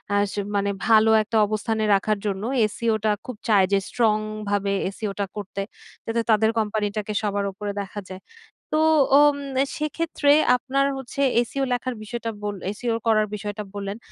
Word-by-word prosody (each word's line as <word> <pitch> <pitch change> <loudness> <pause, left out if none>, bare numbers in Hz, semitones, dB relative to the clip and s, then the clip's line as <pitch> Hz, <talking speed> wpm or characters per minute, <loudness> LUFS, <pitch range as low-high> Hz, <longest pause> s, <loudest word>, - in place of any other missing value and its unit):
আস 205 -1 +1 0.2
মানে 200 0 +1 0.2
ভালো 220 -1 +6
একটা 220 +1 -1
অবস্থানে 220 +1 -1
রাখার 210 +1 0
জন্য 200 -1 -2 0.3
SEO 230 0 0
টা 215 - +4
খুব 250 - -6
চায় 205 -4 +5
যে 200 - +4
স্ট্রংভাবে 215 -3 0 0.2
SEO 215 -2 -3
টা 200 - +1
করতে। 200 -1 -5 0.4
যাতে 230 +1 0
তাদের 220 0 +4
কোম্পানিটাকে 210 -1 -2
সবার 205 -1 -1
উপরে 205 +1 -5
দেখা 200 +1 -7
যায়। 185 0 -8 0.5
তো 310 - +3 0.4
ওম 295 -1 +5 0.3
এ - - -1
সেক্ষেত্রে 305 -1 0 0.3
আপনার 275 +2 0
হচ্ছে 270 +1 -5 0.3
SEO 275 +2 -2
লেখার 250 0 -2
বিষয়টা 230 +1 -4
বল 205 0 -2 0.2
SEO 235 -2 -1
করার 215 -1 +3
বিষয়টা 210 0 -5
বললেন। 200 0 -5
215 Hz, 155 wpm, -24 LUFS, 205-230 Hz, 0.5 s, ভালো